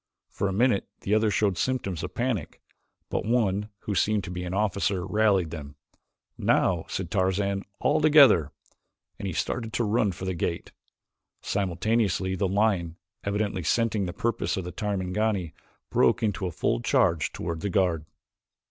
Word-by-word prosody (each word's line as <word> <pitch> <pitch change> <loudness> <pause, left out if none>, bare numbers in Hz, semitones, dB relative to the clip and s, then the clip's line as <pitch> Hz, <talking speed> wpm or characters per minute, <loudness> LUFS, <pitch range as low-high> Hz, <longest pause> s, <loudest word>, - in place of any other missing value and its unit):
For 100 - -1
a - - -1
minute 110 +1 +2
the 100 - -1
others 110 -1 +3
showed 100 -5 +1
symptoms 105 -10 -1
of - - -6
panic 120 - -2 0.5
but - - -1
one, 105 -3 +1
who 105 - -3
seemed 105 +1 +1
to - - -6
be 90 0 -4
an 90 - -4
officer, 100 -2 0
rallied 100 -4 +2
them. 75 -3 -8 0.6
"Now," 85 -3 +2
said 90 -3 -4
Tarzan, 100 +1 +1 0.2
"all - - +2
together!" 140 - +6 0.7
and 100 - -4
he - - -2
started 115 +6 -3
at - - -1
a - - +2
run 105 -1 +2
for 95 +1 -7
the 95 - -1
gate. 85 0 -3 0.7
Simultaneously 95 0 0
the 95 +1 0
lion, 95 -4 +1 0.3
evidently 100 -1 -1
scenting 105 +2 +1
the - - -3
purpose 115 +3 -1
of 95 - -2
the 90 - -6
Tarmangani, 100 -1 -1 0.4
broke - - +3
into 100 -3 0
a - - -4
full - - 0
charge 80 +5 +2
toward 80 -1 -4
the 100 - -1
guard. 90 -5 +1
100 Hz, 165 wpm, -27 LUFS, 90-110 Hz, 0.7 s, together